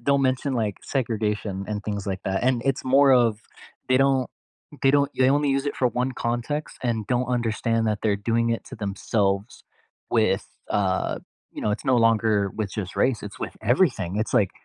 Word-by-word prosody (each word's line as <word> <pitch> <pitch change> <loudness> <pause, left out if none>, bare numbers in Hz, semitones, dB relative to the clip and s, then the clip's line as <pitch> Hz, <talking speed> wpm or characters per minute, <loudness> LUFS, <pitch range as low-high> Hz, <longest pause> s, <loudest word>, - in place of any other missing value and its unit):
don't 140 -1 +3
mention, 130 +1 0
like, 110 -4 -1
segregation, 105 -6 -2
and 105 -1 -3
things 100 -2 -4
like 95 -1 -3
that. 95 +3 -1
And 125 -2 +2
it's 135 -1 0
more 135 +1 +5
of 115 -4 +3 0.5
they 130 - +4
don't, 135 -1 +2 0.5
they 135 - +5
don't 140 -1 +3
they 130 0 +5
only 145 0 +2
use 135 +1 0
it 145 - -2
for 125 - +2
1 125 +2 -1
context, 120 +6 -3
and 115 -4 -1
don't 125 0 0
understand 115 0 0
that 105 -1 0
they're 105 -2 +2
doing 115 0 +2
it 115 - -1
to - - -9
themselves 100 0 -1 0.5
with, - - +2 0.2
uh, 95 -2 0 0.4
you - - -6
know 105 - +1
it's 105 - -3
no - - +5
longer 110 -3 +3
with 105 -3 -2
just 95 -3 -5
race, 130 -4 +2
it's 105 - -11
with - - -9 0.2
everything. 125 - +1
It's 115 - -5
like, 100 -5 +1
115 Hz, 195 wpm, -24 LUFS, 105-130 Hz, 0.5 s, more